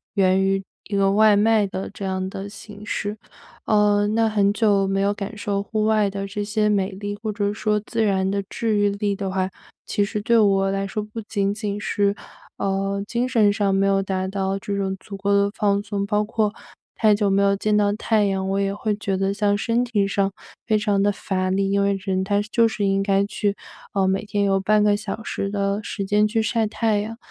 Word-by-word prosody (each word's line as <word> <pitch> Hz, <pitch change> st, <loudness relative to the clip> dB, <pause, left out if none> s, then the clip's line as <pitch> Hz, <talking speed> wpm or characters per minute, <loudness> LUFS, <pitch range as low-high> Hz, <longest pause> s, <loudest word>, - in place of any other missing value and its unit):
源 190 Hz, -2 st, +3 dB
于 195 Hz, 0 st, +1 dB, 0.2 s
一 205 Hz, -, -4 dB
个 195 Hz, 0 st, +3 dB
外 215 Hz, 0 st, +5 dB
卖 215 Hz, 0 st, +3 dB
的 190 Hz, 0 st, -5 dB
这 200 Hz, -1 st, -7 dB
样 190 Hz, 0 st, -2 dB
的 195 Hz, +1 st, -6 dB
形 205 Hz, 0 st, -11 dB
式。 210 Hz, 0 st, -3 dB, 0.5 s
呃， 205 Hz, -1 st, +3 dB
那 225 Hz, +1 st, +2 dB
很 205 Hz, -2 st, +2 dB
久 205 Hz, -3 st, +2 dB
没 195 Hz, 0 st, 0 dB
有 200 Hz, +1 st, +2 dB
感 205 Hz, +1 st, -6 dB
受 200 Hz, -1 st, -2 dB
户 215 Hz, +1 st, -1 dB
外 215 Hz, -1 st, +3 dB
的 195 Hz, 0 st, -4 dB
这 205 Hz, +1 st, -4 dB
些 210 Hz, 0 st, 0 dB
美 200 Hz, -1 st, +1 dB
丽， 205 Hz, +1 st, -5 dB
或 215 Hz, -, -1 dB
者 205 Hz, 0 st, -1 dB
说 210 Hz, 0 st, 0 dB
自 230 Hz, -1 st, -1 dB
然 190 Hz, -2 st, +1 dB
的 200 Hz, 0 st, -1 dB
治 220 Hz, -2 st, -1 dB
愈 205 Hz, 0 st, +3 dB
力 200 Hz, 0 st, -1 dB
的 195 Hz, -1 st, -3 dB
话， 190 Hz, 0 st, -1 dB, 0.4 s
其 205 Hz, -, +1 dB
实 210 Hz, 0 st, -3 dB
对 235 Hz, +2 st, +3 dB
我 195 Hz, -2 st, +3 dB
来 195 Hz, 0 st, -1 dB
说， 215 Hz, -, -3 dB
不 215 Hz, +2 st, -8 dB
仅 200 Hz, -2 st, -1 dB
仅 205 Hz, -1 st, -4 dB
是， 200 Hz, -1 st, +1 dB, 0.4 s
呃， 195 Hz, 0 st, -1 dB
精 240 Hz, +3 st, -1 dB
神 225 Hz, -5 st, +3 dB
上 205 Hz, -1 st, +1 dB
没 195 Hz, 0 st, +2 dB
有 195 Hz, 0 st, +2 dB
达 190 Hz, -1 st, -2 dB
到 195 Hz, 0 st, -2 dB
这 200 Hz, -2 st, -3 dB
种 190 Hz, -1 st, -1 dB
足 200 Hz, -, -9 dB
够 200 Hz, +1 st, 0 dB
的 200 Hz, 0 st, +3 dB
放 200 Hz, -1 st, +2 dB
松。 205 Hz, -1 st, -2 dB
包 210 Hz, 0 st, +1 dB
括 210 Hz, -1 st, -1 dB, 0.4 s
太 215 Hz, -2 st, +4 dB
久 205 Hz, 0 st, +1 dB
没 195 Hz, 0 st, +3 dB
有 200 Hz, 0 st, +3 dB
见 210 Hz, +1 st, 0 dB
到 205 Hz, -1 st, +3 dB
太 215 Hz, -1 st, +1 dB
阳， 190 Hz, -1 st, -1 dB
我 195 Hz, -, 0 dB
也 195 Hz, 0 st, 0 dB
会 210 Hz, +1 st, -1 dB
觉 200 Hz, -2 st, -2 dB
得 195 Hz, +1 st, 0 dB
像 205 Hz, 0 st, +1 dB
身 230 Hz, +3 st, +1 dB
体 215 Hz, -5 st, 0 dB
上 195 Hz, 0 st, 0 dB, 0.4 s
非 215 Hz, -, +3 dB
常 205 Hz, -2 st, +1 dB
地 205 Hz, +1 st, +3 dB
乏 185 Hz, -2 st, -2 dB
力。 195 Hz, +1 st, 0 dB
因 200 Hz, -, +2 dB
为 200 Hz, 0 st, +2 dB
人 190 Hz, -1 st, -1 dB
他 200 Hz, +1 st, +1 dB
就 230 Hz, +2 st, +2 dB
是 210 Hz, -2 st, -2 dB
应 195 Hz, 0 st, +2 dB
该 195 Hz, 0 st, +2 dB
去 205 Hz, 0 st, -1 dB, 0.4 s
呃， 195 Hz, -1 st, +2 dB
每 190 Hz, +2 st, 0 dB
天 205 Hz, -1 st, -1 dB
有 195 Hz, -1 st, +2 dB
半 210 Hz, +2 st, +3 dB
个 205 Hz, -1 st, +4 dB
小 215 Hz, +1 st, -5 dB
时 195 Hz, -, -3 dB
的 200 Hz, 0 st, -1 dB
时 200 Hz, -2 st, -4 dB
间 210 Hz, +2 st, +3 dB
去 225 Hz, +2 st, -1 dB
晒 225 Hz, 0 st, 0 dB
太 215 Hz, -1 st, 0 dB
阳。 225 Hz, +2 st, -6 dB
205 Hz, 245 characters per minute, -22 LUFS, 195-210 Hz, 0.5 s, 外